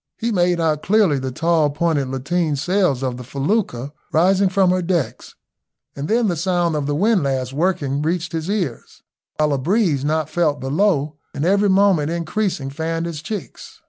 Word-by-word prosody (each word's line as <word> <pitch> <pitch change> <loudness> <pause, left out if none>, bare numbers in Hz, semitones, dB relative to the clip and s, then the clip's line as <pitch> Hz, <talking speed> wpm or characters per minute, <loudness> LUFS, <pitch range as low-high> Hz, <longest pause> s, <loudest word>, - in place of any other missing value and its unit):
He 235 +1 -1
made 175 -3 +2
out 155 -2 +1
clearly 195 -8 +3
the 130 0 -4
tall 165 +2 +2
pointed 150 -2 0
lateen 150 +5 -1
sails 180 -3 +1
of 125 -2 -2
the 125 - -8
felucca 140 - -2 0.2
rising 190 +4 +3
from 190 -1 +3
her 185 0 +1
decks, 170 -4 -2 0.6
and 140 +1 -4
then 230 +2 +2
the 175 - 0
sound 175 -1 0
of 145 -2 -2
the 145 - 0
windlass 140 - +1
working 145 -3 0
reached 165 +2 -1
his 165 +1 -3
ears; 180 - -4 0.3
while 150 -1 +2
a 140 - 0
breeze, 165 - +1
not 155 0 0
felt 155 -2 0
below 150 0 0 0.2
and 140 - -1
every 200 +2 +3
moment 190 -6 +3
increasing, 170 -3 -2
fanned 165 +3 -3
his 165 -3 -5
cheeks. 205 +1 -7
165 Hz, 175 wpm, -20 LUFS, 145-185 Hz, 0.6 s, clearly